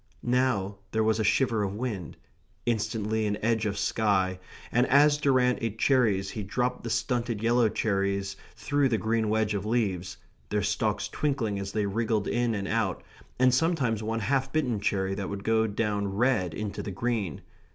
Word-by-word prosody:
Now 120 -6 +1 0.2
there 110 0 +2
was 110 0 +2
a - - +2
shiver 115 +1 +2
of 100 -1 -2
wind 105 -7 -4 0.5
instantly 110 -1 0
an 105 0 -1
edge 110 -2 +1
of 100 -1 -3
sky; 95 -4 +1 0.3
and 125 +2 +3
as 145 +2 +5
Durrant 130 -3 +3
ate 115 -2 -3
cherries 110 -8 +2
he 110 - -5
dropped 125 +5 -2
the 115 - -4
stunted 115 -1 -1
yellow 120 -1 +3
cherries 100 -2 -1 0.2
through 145 -1 +1
the 115 - +1
green 110 +1 0
wedge 110 -1 +1
of 100 -2 -2
leaves, 95 -5 -1 0.3
their 105 -1 0
stalks - - 0
twinkling 120 -9 -1
as 100 0 -4
they 105 -1 0
wriggled 110 +1 0
in 120 -2 0
and 100 -1 -3
out, 110 -4 -1 0.3
and 130 0 +4
sometimes 130 -7 +1
one 110 +1 -2
half 135 +4 0
bitten 130 -9 0
cherry 95 -1 0
would 100 0 -4
go 110 0 +2
down 105 -1 -1
red 100 -5 +1
into 105 -1 -4
the - - -5
green. 100 - -2
110 Hz, 170 wpm, -28 LUFS, 100-120 Hz, 0.5 s, as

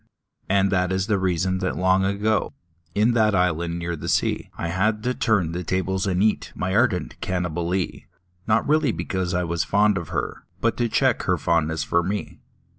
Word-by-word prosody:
And 95 0 +3
that 90 -1 +1
is 95 0 0
the 105 -2 +1
reason 95 0 0
that 95 -1 -2
long 95 +1 +3
ago. 105 +3 0 0.4
In 110 +4 +3
that 110 -3 +3
island 85 -2 0
near 85 0 -3
the 75 - -5
sea, - - 0
I 85 - -3
had 105 +5 0
to 125 - 0
turn 100 -10 +1
the 90 +2 -4
tables 95 +2 -1
and 95 0 +1
eat 110 - 0
My 95 +2 -2
ardent 110 -6 +1
Cannibalee 90 0 -2 0.2
— 90 0 -39
Not 110 0 +2
really 150 -3 +3
because 95 -3 -2
I 90 - +1
was 85 -3 -1
fond 105 +2 +2
of 85 - -8
her, - - -3 0.2
But 115 +3 +1
to 120 -1 0
check 130 0 +2
her 90 - +3
fondness 80 -2 0
for 85 +4 +1
me. 100 +4 -4
95 Hz, 190 wpm, -23 LUFS, 90-105 Hz, 0.4 s, And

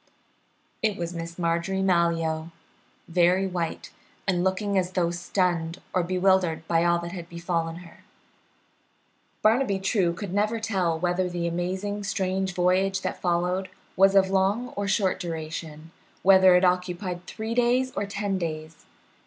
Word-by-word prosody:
It 215 -3 0
was 170 0 -4
Miss 170 0 -6
Marjorie 170 +3 0
Malyoe, 165 -3 +1 0.6
very 180 +2 +3
white, 175 -3 -4 0.4
and 180 -2 +1
looking 200 +2 0
as 185 -1 0
though 170 -2 +1
stunned 175 -1 -1
or 185 - +2
bewildered 180 -2 +1
by 165 0 +2
all 170 0 +3
that 170 0 -6
had 175 -2 -8
befallen 170 -1 -2
her. 165 - -17 1.4
Barnaby 220 -2 +3
True 190 -3 +1
could 185 +1 -6
never 215 +3 +1
tell 190 -7 0
whether 180 +2 0
the 175 -1 -3
amazing 185 +4 -2
strange 190 -1 -1
voyage 190 +2 +2
that - - -4
followed 180 +2 0 0.3
was 195 +1 +5
of 190 -1 +4
long 195 +6 +1
or 200 - -4
of - - -2
short 195 -3 +1
duration; 160 -2 -6 0.3
whether 190 -1 +7
it 180 +1 +4
occupied 180 0 -1
three 220 +1 -4
days 245 +2 +2
or 200 - -3
ten 200 -1 -2
days. 155 -1 -6
180 Hz, 145 wpm, -26 LUFS, 170-195 Hz, 1.4 s, whether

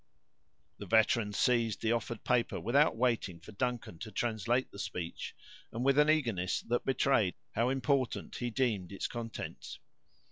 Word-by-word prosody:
The - - -7
veteran 110 -1 +3
seized 115 0 +1
the 110 - +2
offered 115 -1 -2
paper, 120 -5 +1
without 120 - +3
waiting 115 -8 0
for 95 +5 -12
Duncan 120 -5 -3
to 110 - -6
translate 120 +3 0
the 100 - -10
speech, 85 -4 -5 0.4
and 120 +2 -3
with 140 +1 +4
an 150 +1 +5
eagerness 115 - +1
that 120 +1 -1
betrayed 130 -7 +2 0.2
how 115 +3 +1
important 135 -1 0
he 120 - -2
deemed 110 -7 0
its 100 - -4
contents. 115 -2 -6
115 Hz, 150 wpm, -32 LUFS, 105-125 Hz, 0.4 s, an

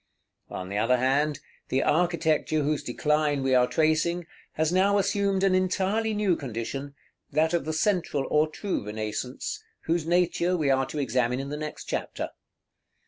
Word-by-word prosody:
On 90 0 -6
the 100 +1 -1
other 120 +4 +3
hand, 140 +3 +1 0.3
the 130 +1 +1
architecture 160 -2 +1
whose 150 +1 0
decline 150 +2 0
we 135 0 +2
are 125 -1 +5
tracing, 160 +3 +1 0.3
has 160 +1 +1
now 200 +2 +4
assumed 200 -1 +1
an 195 -1 +4
entirely 195 +4 +1
new 205 -4 +2
condition, 135 +2 -5 0.3
that 160 +3 +1
of 170 -5 +1
the 155 - -1 0.2
Central 175 -8 0
or 150 +1 +4
True 195 - -3
Renaissance, 110 +4 -4 0.2
whose 165 -1 -1
nature 175 +1 +2
we 145 -4 +2
are 135 0 +2
to - - -6
examine 125 -2 0
in 135 +1 -4
the 145 - -3
next 150 0 -6
chapter. - - -3
155 Hz, 160 wpm, -27 LUFS, 135-175 Hz, 0.3 s, are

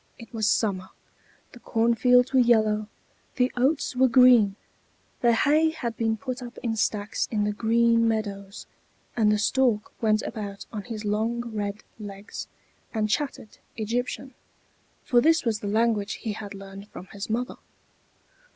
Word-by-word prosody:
It 230 +1 -13
was 220 -2 +1
summer; 190 -4 0 0.6
the 245 - -13
cornfields 245 +3 +3
were 260 - +5
yellow, 215 -3 +3 0.5
the 250 0 +2
oats 265 +2 +1
were 260 +1 +5
green, 240 -5 +6 0.7
the 240 - +5
hay 300 +6 +3
had 240 -8 -4
been 225 -1 0
put 255 +1 -5
up 240 -1 -9
in 230 -2 -1
stacks 210 0 -1
in 210 -2 0
the 210 - 0
green 230 +1 +3
meadows; 200 -3 -3 0.5
and 215 -3 +3
the 210 - +3
stork 225 0 +1
went 215 -1 +2
about 200 -2 -6
on 210 -2 -5
his 220 -3 -6
long 230 +3 -1
red 205 0 -4 0.2
legs, 200 0 -8 0.5
and 215 -1 0
chattered 275 -5 -3 0.2
Egyptian, 245 +4 -3 0.7
for 240 -1 +3
this 325 +2 +3
was 220 -2 0
the 205 - -5
language 215 -1 +1
he 220 - -4
had 205 -1 -8
learned 195 +1 -10
from 185 - -10
his 200 +2 -6
mother. 240 +3 -2
225 Hz, 150 wpm, -26 LUFS, 210-245 Hz, 0.7 s, green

